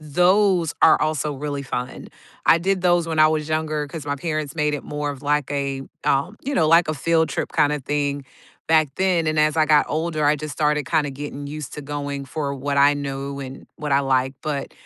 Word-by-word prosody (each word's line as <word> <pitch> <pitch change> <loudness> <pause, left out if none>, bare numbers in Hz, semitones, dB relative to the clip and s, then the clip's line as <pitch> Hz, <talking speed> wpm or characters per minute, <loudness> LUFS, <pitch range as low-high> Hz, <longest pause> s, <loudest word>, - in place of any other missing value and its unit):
Those 180 +3 +2
are - - +6
also 150 -1 -1
really 145 +1 -4
fun. 125 -1 -5 0.4
I - - +7
did 190 +2 0
those 175 -2 +2
when 160 -1 -3
I 155 0 +7
was 155 -1 -1
younger, 155 -1 -1
'cause 145 0 -8
my 145 0 -1
parents 155 0 -3
made 150 -1 +1
it 145 - -5
more 145 0 -3
of 140 -1 -9
like 150 -1 0
a, 140 -1 -2 0.2
um, 140 +10 +1
you 280 +2 -3
know, 160 - +3
like 165 +1 +5
a 155 - 0
field 160 +3 +1
trip - - -3
kinda 150 0 +2
thing, 145 0 -2 0.4
back 160 -2 +4
then, 185 -3 +1
and, 155 0 0
as 155 0 +3
I 155 -1 +3
got 150 -1 +5
older, 155 0 -1
I 145 +1 +4
just 155 0 -6
started 150 +1 0
kinda 150 -3 +1
getting 145 +1 -7
used 150 -2 -7
to 150 - -7
going 145 -1 -4
for 140 +1 -3
what 140 +1 -3
I 140 +1 +5
knew, 140 -1 -5
and 135 0 -9
what 150 -2 -3
I 140 - +4
like, 130 -1 +1
but, 145 -3 -3
150 Hz, 220 wpm, -22 LUFS, 140-155 Hz, 0.4 s, I